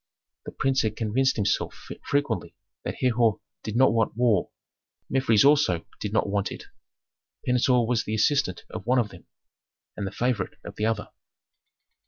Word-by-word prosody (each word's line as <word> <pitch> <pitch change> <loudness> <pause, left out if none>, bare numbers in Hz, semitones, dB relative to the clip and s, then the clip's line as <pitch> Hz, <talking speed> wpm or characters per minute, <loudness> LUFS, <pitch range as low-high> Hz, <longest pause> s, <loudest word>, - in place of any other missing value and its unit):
The - - -6
prince 135 0 +1
had 110 -1 -1
convinced 120 +5 +1
himself 105 - 0 0.3
frequently 145 0 -1 0.3
that - - -4
Herhor 120 -4 +2 0.2
did 110 - -5
not 130 -1 +5
want 115 -1 0
war; 115 -7 +2 0.6
Mefres 130 -4 +4
also 140 - +4
did 105 - -3
not 110 - +1
want 100 0 -1
it. - - -7 0.8
Pentuer 125 -1 +3
was 120 0 +1
the 110 - -3
assistant 110 -4 +1
of - - -7
one 130 +1 +3
of 115 -4 +1
them, - - -15 0.7
and 100 - -3
the - - -5
favorite 120 -6 -1
of 100 - -8
the 105 - 0
other. 110 -2 -2
115 Hz, 160 wpm, -26 LUFS, 105-130 Hz, 0.8 s, not